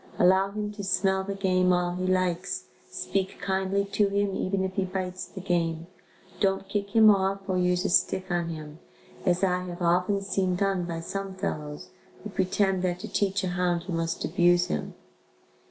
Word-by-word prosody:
Allow 190 +2 +4
him 210 +1 -4
to 205 -1 -7
smell 190 0 +1
the 200 +1 -4
game 185 -2 +2
all 180 0 +1
he 185 +1 -2
likes, 185 0 0 0.2
speak 195 -1 -2
kindly 195 +1 0
to 205 -1 +3
him 200 -1 0
even 190 0 0
if 190 0 -2
he 195 - 0
bites 185 0 -4
the 190 - -9
game, 170 -3 0 0.5
don't 195 0 +1
kick 200 +1 -3
him 220 -1 +8
off 195 0 +1
or 185 -1 +1
use 180 +1 +1
a - - +2
stick 190 +1 +2
on 170 -1 0
him, 155 -1 -7 0.5
as 180 +1 +2
I 180 -1 +1
have 175 0 -6
often 180 +4 +2
seen 195 -2 0
done 195 -1 0
by 165 -1 -4
some 195 +2 -5
fellows 150 -5 -4 0.3
who 210 - -6
pretend 190 0 +1
that 180 -1 0
to 220 - -5
teach 195 -2 0
a 185 - 0
hound 175 -1 0
you 185 - -3
must 165 0 -1
abuse 175 0 +3
him. 75 - -3
185 Hz, 185 wpm, -27 LUFS, 175-195 Hz, 0.5 s, him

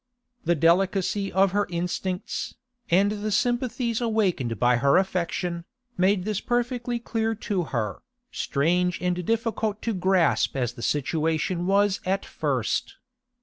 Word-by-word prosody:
The 170 +1 +3
delicacy 190 +4 +2
of 190 0 +3
her 205 +1 +1
instincts, 180 +1 -3 0.3
and 195 +4 +4
the 210 0 -3
sympathies 240 +1 0
awakened 190 - 0
by 125 +2 +4
her 140 +6 +4
affection, 180 -2 -1 0.3
made 190 -1 +2
this 210 -2 -1
perfectly 245 0 -1
clear 225 -1 -1
to 200 -4 -2
her, 110 -8 -3 0.3
strange 180 +5 0
and 180 0 -1
difficult 225 0 -1
to 230 - 0
grasp 185 -6 +2
as 125 -2 -1
the 120 - -10
situation 160 +5 0
was 200 0 +3
at 195 +1 -1
first. 400 - -1
190 Hz, 130 wpm, -25 LUFS, 170-215 Hz, 0.3 s, and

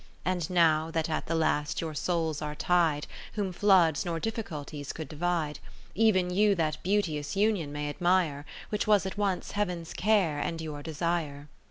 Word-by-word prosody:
And 180 -3 -1
now 165 -3 +3
that 160 0 -1
at 155 - -2
the 165 - 0
last 155 -2 +1
your 160 -2 -3
souls 160 -1 -1
are 150 0 -4
tied, 160 -3 +2 0.3
Whom 200 -4 -2
floods 175 -6 +4
nor 170 -1 -2
difficulties 155 - -5
could 160 -3 -6
divide, 160 0 -1 0.4
Ev'n 190 -5 +3
you 205 +2 +4
that 155 -3 -1
beauteous 175 -6 0
union 200 -7 +1
may 145 0 -3
admire. 170 -2 +1 0.3
Which 210 0 -1
was 205 -2 +4
at 190 +2 -4
once 195 -3 -1
Heaven's 180 -5 -2
care, 190 -8 +2
and 165 +2 -2
your 155 -2 -5
desire. 155 -2 -3
165 Hz, 165 wpm, -29 LUFS, 150-185 Hz, 0.4 s, floods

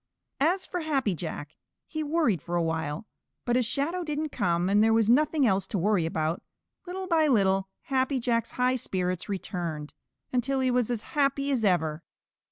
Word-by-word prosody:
As 350 +7 +2
for 360 - -3
Happy 275 - 0
Jack, 155 -3 -6 0.3
he 315 - -4
worried 295 - +1
for 175 +2 -4
a 170 - +2
while, 160 +1 -2 0.4
but 240 - +1
as 250 -3 +2
Shadow 330 +9 -1
didn't 305 -1 -2
come, 175 -4 +1
and 205 +2 +4
there 225 0 +4
was 225 0 +4
nothing 300 +2 +3
else 195 -4 +2
to 205 - -2
worry 185 -2 +2
about, 160 +1 -1 0.5
little 375 +1 -4
by 325 -4 +3
little 195 -6 +2
Happy 265 0 0
Jack's 230 -1 0
high 255 +1 +2
spirits 185 -4 -2
returned, 170 -6 -4 0.4
until 260 +2 +1
he 260 -1 +2
was 245 -2 +1
as 235 -3 -2
happy 275 -1 +1
as 250 -5 0
ever. 160 -5 +1
230 Hz, 175 wpm, -28 LUFS, 180-280 Hz, 0.5 s, and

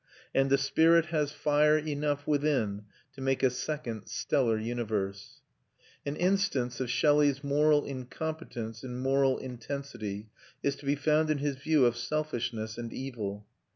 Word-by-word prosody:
And 135 0 +3
the 140 - +5
spirit 160 +4 +4
has 150 -2 +1
fire 150 +1 +3
enough 145 -1 -1
within 140 -9 0 0.3
to 135 - -10
make 135 0 0
a 130 - +5
second 125 -5 -4
stellar 115 +1 +1
universe. 110 -4 -3 0.7
An 140 - -1
instance 180 -10 +1
of 130 -2 -2
Shelley's 145 +2 +3
moral 145 +1 +3
incompetence 130 -4 -5
in 125 -1 -5
moral 135 +1 +2
intensity 120 -5 -6 0.3
is 140 0 +1
to 140 - -11
be 140 - +3
found 155 +2 +2
in 155 - +2
his 140 -1 -2
view 145 0 +3
of 120 -1 +3
selfishness 120 -4 -3
and 115 -1 -5
evil. 105 -6 -5
135 Hz, 145 wpm, -30 LUFS, 120-150 Hz, 0.7 s, the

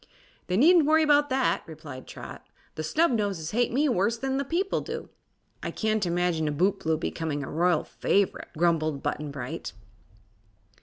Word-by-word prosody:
"They 180 - 0
needn't 320 - +6
worry 315 0 +5
'bout 290 -1 +4
that," 260 -1 +1
replied 150 -5 -9
Trot; - - -9 0.3
"the - - -5
Snubnoses 205 - 0
hate 240 +2 +1
me 285 +5 +2
worse 230 -1 +1
than 265 +2 -2
the 275 - 0
people 350 +8 -1
do." - - -6 0.5
"I - - -3
can't 215 -3 0
imagine 170 -2 0
a - - 0
bootblue 160 0 +1
becoming 155 -3 -3
a - - -6
royal 170 0 +2
favorite," 200 -1 0
grumbled 155 -4 +1
Button 150 0 -2
Bright. 145 +3 -6
185 Hz, 155 wpm, -27 LUFS, 160-265 Hz, 0.5 s, needn't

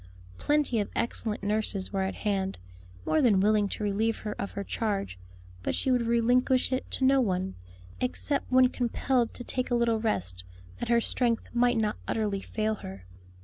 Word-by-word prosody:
Plenty 290 -6 +1
of 205 - -1
excellent 220 -3 -2
nurses 205 -2 0
were 195 - 0
at 190 0 -2
hand, 195 -2 -1 0.5
more 310 - +2
than 220 -8 +4
willing 210 0 +3
to 210 - -4
relieve 215 +2 0
her 210 - -2
of 200 - -3
her 200 - -4
charge; 200 - -2 0.4
but - - -1
she 260 - 0
would 245 -2 +2
relinquish 245 +3 +3
it 260 - -2
to 265 - 0
no 270 0 +5
one; 190 -4 -1 0.5
except 275 +3 -1
when 255 0 +6
compelled 245 0 0
to 245 - -6
take 255 +1 -2
a 245 - +2
little 235 -2 +2
rest 90 - -1 0.4
that - - -4
her 235 0 +4
strength 235 -1 +1
might 245 0 +3
not 215 -1 0
utterly 205 -3 -1
fail 215 +1 -1
her. 95 -1 -9
225 Hz, 180 wpm, -28 LUFS, 200-245 Hz, 0.5 s, when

